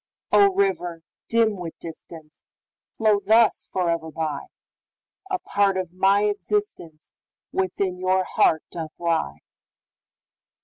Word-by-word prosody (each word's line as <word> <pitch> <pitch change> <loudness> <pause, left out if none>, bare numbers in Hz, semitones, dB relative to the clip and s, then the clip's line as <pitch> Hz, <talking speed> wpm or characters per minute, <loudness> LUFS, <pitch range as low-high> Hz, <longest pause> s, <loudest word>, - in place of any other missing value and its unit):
O, 400 -1 +6
river, 180 - 0 0.2
dim 225 -3 +2
with 170 -3 -7
distance, 160 -1 -12 0.5
Flow 215 -2 +2
thus 220 +2 +3
forever 170 -3 -1
by,A 160 - -7
part 200 - +1
of 180 -2 -4
my 195 +2 +3
existenceWithin 190 - -3
your 185 0 +2
heart 160 -3 +2
doth 160 -2 -6
lie! 165 - -1
185 Hz, 95 wpm, -24 LUFS, 165-210 Hz, 0.5 s, O